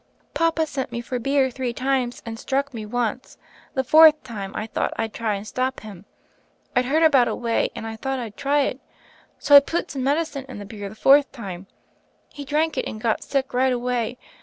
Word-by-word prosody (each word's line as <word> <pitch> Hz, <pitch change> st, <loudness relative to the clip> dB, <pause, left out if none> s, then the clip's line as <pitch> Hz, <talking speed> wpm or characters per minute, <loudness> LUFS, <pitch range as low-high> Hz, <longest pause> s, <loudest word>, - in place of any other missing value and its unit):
"Papa 330 Hz, -1 st, +1 dB
sent 270 Hz, -4 st, -4 dB
me 235 Hz, -, -3 dB
for 245 Hz, +1 st, -4 dB
beer 270 Hz, +1 st, +1 dB
three 250 Hz, -1 st, -3 dB
times, 255 Hz, -1 st, -1 dB
and 225 Hz, -1 st, -6 dB
struck 280 Hz, +1 st, -1 dB
me 220 Hz, -2 st, -6 dB
once. 245 Hz, +1 st, -3 dB, 0.4 s
The 265 Hz, -, +1 dB
fourth 310 Hz, +3 st, +7 dB
time 200 Hz, -5 st, -6 dB
I 215 Hz, -, -3 dB
thought 220 Hz, -, -2 dB
I'd 225 Hz, -1 st, -2 dB
try 220 Hz, -3 st, -1 dB
and 200 Hz, +1 st, -6 dB
stop 255 Hz, +3 st, -2 dB
him. 205 Hz, -3 st, -11 dB, 0.7 s
I'd 250 Hz, -, +3 dB
heard 310 Hz, +5 st, +2 dB
about 275 Hz, -6 st, +5 dB
a -, -, -1 dB
way, 230 Hz, -1 st, 0 dB
and -, -, -6 dB
I 225 Hz, 0 st, -6 dB
thought 270 Hz, +3 st, -3 dB
I'd 230 Hz, -4 st, -6 dB
try 285 Hz, +1 st, +1 dB
it. 275 Hz, -, -2 dB, 0.6 s
So 285 Hz, -, +4 dB
I -, -, +13 dB
put 330 Hz, +5 st, -3 dB
some 265 Hz, -2 st, -4 dB
medicine 285 Hz, 0 st, -1 dB
in 260 Hz, -, -8 dB
the 205 Hz, -, -7 dB
beer 205 Hz, -1 st, -7 dB
the 215 Hz, -, -12 dB
fourth 280 Hz, +5 st, +5 dB
time. 195 Hz, -7 st, -8 dB, 0.6 s
He 290 Hz, -, -9 dB
drank 305 Hz, +3 st, 0 dB
it, -, -, -2 dB
and 215 Hz, -, -6 dB
got 220 Hz, 0 st, 0 dB
sick 270 Hz, -2 st, -2 dB
right 260 Hz, +1 st, +2 dB
away. 245 Hz, -1 st, -1 dB
255 Hz, 210 wpm, -23 LUFS, 225-280 Hz, 0.7 s, I